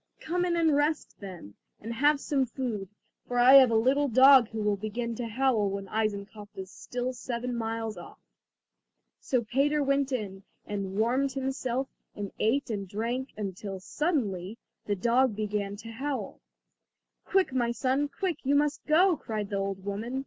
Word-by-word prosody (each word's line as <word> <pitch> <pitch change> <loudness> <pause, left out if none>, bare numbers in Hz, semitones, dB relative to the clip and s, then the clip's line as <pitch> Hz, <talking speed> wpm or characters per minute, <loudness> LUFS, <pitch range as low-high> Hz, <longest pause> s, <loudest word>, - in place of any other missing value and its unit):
"Come 355 +2 -1
in 345 -1 0
and 325 -3 +3
rest 295 +2 0
then, 180 - -9 0.3
and 225 +2 -6
have 290 +4 +3
some 275 -2 0
food, 230 -6 -4 0.4
for 245 - -2
I 245 +2 +7
have 270 -3 +9
a 230 - +1
little 265 +6 +3
dog 260 0 +7
who 225 - -6
will 210 -1 +2
begin 225 +3 -4
to 240 - -3
howl 230 -3 +1
when 195 0 -5
Eisenkopf 210 -1 -3
is 190 0 -7
still 250 +1 -4
seven 245 0 -4
miles 225 -1 -3
off." - - -11 1.0
So 250 -3 0
Peter 280 +6 +1
went 275 0 +1
in 200 -6 -3 0.2
and 195 -2 -4
warmed 255 +5 +1
himself 265 -1 -2 0.3
and 205 -1 -5
ate 240 +3 +1
and 200 -2 -3
drank, 235 +6 -3 0.3
till 195 0 -6
suddenly 215 - -2 0.3
the 205 - +1
dog 235 +4 +2
began 210 -1 -2
to 225 +2 -9
howl. 275 +4 -4 0.8
"Quick, 380 -8 +1
my 240 -2 +1
son, 265 +4 0
quick, 345 +5 -3
you 280 +1 +2
must 295 +1 +1
go," 345 +4 +5
cried 215 -7 -5
the 200 - -1
old 195 -1 -3
woman. 220 +6 -3
240 Hz, 165 wpm, -28 LUFS, 210-275 Hz, 1.0 s, have